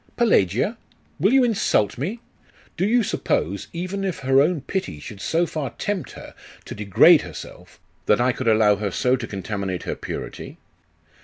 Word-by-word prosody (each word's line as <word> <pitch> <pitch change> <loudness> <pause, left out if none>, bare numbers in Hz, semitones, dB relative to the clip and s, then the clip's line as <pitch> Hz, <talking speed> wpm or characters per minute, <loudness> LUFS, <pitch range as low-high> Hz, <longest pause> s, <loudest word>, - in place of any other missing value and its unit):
Pelagia! 200 - +2 0.4
Will 195 +8 +3
you 265 0 +5
insult 215 - +1
me? 195 - -4 0.5
Do 190 - 0
you 240 +2 +3
suppose, 100 - -1
even 185 +3 -4
if 190 -6 -3
her 135 +1 +4
own 160 +1 +1
pity 140 - -4
should 100 +6 -10
so 170 +2 +1
far 155 -5 -4
tempt 205 -3 -3
her - - -11 0.3
to - - -7
degrade 100 -3 +5
herself, - - -11 0.3
that 105 - +4
I 125 +1 +3
could 125 0 -5
allow 110 -2 +4
her 105 0 -2
so 125 +7 +1
to 125 -3 -5
contaminate 100 -2 -4
her - - -3
purity? - - -7
135 Hz, 165 wpm, -23 LUFS, -, 0.5 s, you